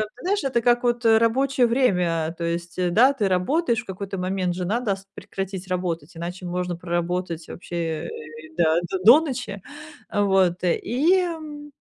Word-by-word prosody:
ты 250 Hz, -, -15 dB
знаешь, 400 Hz, +3 st, 0 dB
это 260 Hz, -3 st, +1 dB
как, 240 Hz, +1 st, +3 dB
вот, 240 Hz, -1 st, 0 dB
э, 225 Hz, -1 st, +6 dB
рабочее 250 Hz, +3 st, +2 dB
время, 180 Hz, -10 st, +1 dB
то 170 Hz, -, -5 dB
есть, 170 Hz, 0 st, -4 dB
э, 180 Hz, -1 st, +1 dB
да, 235 Hz, +9 st, +5 dB
ты 220 Hz, -8 st, 0 dB
работаешь 235 Hz, -, +1 dB
в -, -, -19 dB
какой-то 195 Hz, 0 st, -6 dB
момент, 185 Hz, -1 st, -1 dB
же 180 Hz, 0 st, -3 dB
надо 215 Hz, +1 st, 0 dB
ст 195 Hz, 0 st, -16 dB
прекратить 195 Hz, -1 st, -6 dB
работать, 175 Hz, -3 st, -3 dB
иначе 175 Hz, +2 st, -6 dB
можно 180 Hz, 0 st, -2 dB
проработать 175 Hz, -1 st, -3 dB
вообще, 175 Hz, -, -8 dB, 0.3 s
э, -, -, -5 dB, 0.5 s
да, 165 Hz, -1 st, +3 dB
до 190 Hz, -, -2 dB
до 235 Hz, +9 st, +9 dB
ночи. 250 Hz, -10 st, -5 dB, 0.5 s
Э, 205 Hz, -, 0 dB
вот, 190 Hz, -3 st, +2 dB
э. 175 Hz, -, +2 dB
И, 295 Hz, +10 st, +2 dB
м, 305 Hz, -4 st, -6 dB
195 Hz, 180 wpm, -24 LUFS, 175-245 Hz, 0.5 s, до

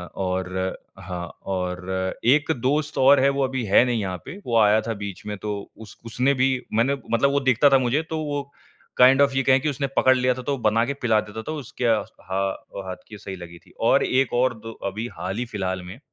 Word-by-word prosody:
और 95 Hz, 0 st, -2 dB, 0.2 s
हाँ, 90 Hz, -2 st, -5 dB, 0.2 s
और 95 Hz, 0 st, -3 dB
एक 150 Hz, +6 st, +4 dB
दोस्त 150 Hz, +4 st, 0 dB
और 135 Hz, +2 st, +6 dB
है 135 Hz, +1 st, +4 dB
वो 140 Hz, 0 st, 0 dB
अभी 130 Hz, -1 st, -1 dB
है 100 Hz, +3 st, +5 dB
नहीं 120 Hz, -3 st, 0 dB
यहाँ 95 Hz, -2 st, -3 dB
पे। 190 Hz, -, -8 dB
वो 115 Hz, -1 st, +1 dB
आया 105 Hz, 0 st, +5 dB
था 115 Hz, -, -1 dB
बीच 100 Hz, -1 st, -7 dB
में 105 Hz, -1 st, -4 dB
तो 105 Hz, -1 st, -2 dB, 0.2 s
उस 110 Hz, -1 st, -12 dB
उसने 125 Hz, +4 st, +1 dB
भी 130 Hz, 0 st, +2 dB, 0.2 s
मैंने 120 Hz, +6 st, +2 dB, 0.2 s
मतलब 130 Hz, +4 st, +3 dB
वो 140 Hz, -, +2 dB
देखता 135 Hz, +1 st, +4 dB
था 135 Hz, -, +6 dB
मुझे 130 Hz, +4 st, +1 dB
तो 160 Hz, -, -2 dB
वो 145 Hz, -1 st, -2 dB, 0.6 s
काइन्ड 130 Hz, +2 st, +7 dB
ऑफ़ 140 Hz, -1 st, +4 dB
ये 135 Hz, -, +2 dB
कहे 130 Hz, +1 st, +4 dB
कि 150 Hz, +3 st, -1 dB
उसने 140 Hz, -1 st, -2 dB
पकड़ 130 Hz, 0 st, +5 dB
लिया 125 Hz, 0 st, +2 dB
था 130 Hz, -, -7 dB
तो 140 Hz, +1 st, -1 dB
बना 115 Hz, -1 st, +2 dB
के 140 Hz, -, -2 dB
पिला 110 Hz, -4 st, +3 dB
देता। 105 Hz, +1 st, -8 dB
तो 155 Hz, +8 st, -5 dB
उसके 130 Hz, -2 st, -5 dB
हा 105 Hz, -4 st, -1 dB, 0.5 s
हाथ 95 Hz, -, -5 dB
की 105 Hz, -, -10 dB
सही 95 Hz, -1 st, -7 dB
लगी 85 Hz, -2 st, -10 dB
थी। -, -, -20 dB, 0.2 s
और -, -, +4 dB
एक 130 Hz, -1 st, +1 dB
और 125 Hz, +1 st, +2 dB
दो 115 Hz, -, -6 dB, 0.2 s
अभी 110 Hz, +4 st, -4 dB
हाल 95 Hz, +3 st, -4 dB
ही 125 Hz, -, -2 dB
फ़िलहाल 95 Hz, -5 st, -3 dB
में 95 Hz, +6 st, -10 dB
120 Hz, 225 wpm, -23 LUFS, 100-135 Hz, 0.6 s, काइन्ड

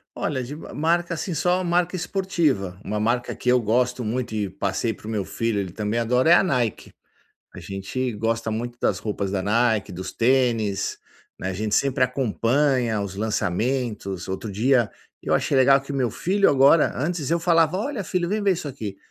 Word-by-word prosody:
Olha, 130 Hz, -4 st, -2 dB
de 140 Hz, +5 st, -7 dB
marca, 170 Hz, +3 st, -1 dB
assim, 170 Hz, +3 st, -3 dB
só 180 Hz, +4 st, +1 dB
marca 175 Hz, +1 st, +1 dB
esportiva. 160 Hz, -, -1 dB
Uma 105 Hz, 0 st, -3 dB
marca 120 Hz, +3 st, 0 dB
que -, -, -9 dB
eu 125 Hz, 0 st, +4 dB
gosto 125 Hz, +3 st, +1 dB
muito 120 Hz, +2 st, -3 dB
e 105 Hz, -3 st, -1 dB
passei 100 Hz, +4 st, -2 dB
para 105 Hz, -, -13 dB
o -, -, -4 dB
meu 105 Hz, -3 st, -1 dB
filho, 115 Hz, +1 st, -2 dB
ele 95 Hz, -3 st, -3 dB
também 105 Hz, +3 st, -2 dB
adora, 125 Hz, +7 st, +3 dB
é -, -, +10 dB
a 175 Hz, -, +6 dB
Nike. 125 Hz, -, -1 dB, 0.6 s
A -, -, -9 dB
gente 100 Hz, +6 st, -4 dB
gosta 115 Hz, +1 st, -1 dB
muito 120 Hz, +2 st, -4 dB
das 95 Hz, -, 0 dB
roupas 105 Hz, -2 st, -3 dB
da 95 Hz, -1 st, -1 dB
Nike, 110 Hz, 0 st, +1 dB
dos 90 Hz, +1 st, -6 dB
tênis, 115 Hz, -5 st, +1 dB, 0.4 s
né, 95 Hz, -, -3 dB
a -, -, -2 dB
gente 105 Hz, +2 st, -2 dB
sempre 135 Hz, -2 st, +2 dB
acompanha 125 Hz, -1 st, +1 dB
os 100 Hz, -2 st, -4 dB
lançamentos. 110 Hz, -1 st, -2 dB
Outro 95 Hz, +3 st, -4 dB
dia 120 Hz, +2 st, +2 dB, 0.3 s
eu -, -, 0 dB
achei 140 Hz, -, +1 dB
legal 135 Hz, +1 st, +6 dB
que 135 Hz, +1 st, -8 dB
meu 130 Hz, -4 st, 0 dB
filho 195 Hz, -, +2 dB
agora 140 Hz, +3 st, +5 dB
antes 155 Hz, +1 st, -2 dB
eu 170 Hz, 0 st, +2 dB
falava: 165 Hz, 0 st, +3 dB
"Olha, 230 Hz, -4 st, -3 dB
filho, 175 Hz, -1 st, -1 dB
vem 210 Hz, +1 st, -1 dB
ver 200 Hz, -1 st, +4 dB
isso 165 Hz, -4 st, -4 dB
aqui". 110 Hz, -8 st, -6 dB
125 Hz, 190 wpm, -23 LUFS, 105-150 Hz, 0.6 s, é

